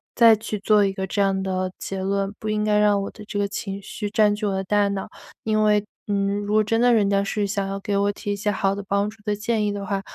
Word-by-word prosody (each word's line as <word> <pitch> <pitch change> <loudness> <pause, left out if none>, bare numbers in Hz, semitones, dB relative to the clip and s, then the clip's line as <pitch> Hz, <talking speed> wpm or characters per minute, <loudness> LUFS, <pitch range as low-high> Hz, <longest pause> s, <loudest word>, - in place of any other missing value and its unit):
再 230 -2 +7
去 215 -1 -5
做 210 0 +4
一 195 - +1
个 190 0 -4
这 200 - -1
样 195 -1 +1
的 185 -1 -2
结 195 -1 -4
论。 195 +1 -1
不 215 - -4
应 210 0 0
该 210 -1 +3
让 205 -1 +3
我 - - -4
的 210 - -12
这 205 -1 -4
个 200 - +1
情 200 -1 -5
绪 205 +1 -5
占 210 -1 +3
据 210 0 -4
我 200 - +1
的 190 - -1
大 205 +1 +2
脑， 200 -1 -3 0.4
因 215 -1 +1
为， 210 -1 +3 0.2
嗯， 200 0 0
如 205 - -4
果 215 - +5
真 225 +2 +1
的 245 -1 +5
人 205 -3 +3
家 200 0 +2
是 200 0 -1
想 200 0 -1
要 195 0 -4
给 200 0 -2
我 200 +1 +2
提 205 0 -4
一 - - -2
些 210 +1 -1
好 195 -1 0
的 200 - -6
帮 200 +1 +1
助 220 - -13
的 210 -1 -1
建 220 0 -1
议 205 - 0
的 200 -1 -5
话， 195 0 -2
205 Hz, 310 characters per minute, -23 LUFS, 195-210 Hz, 0.4 s, 再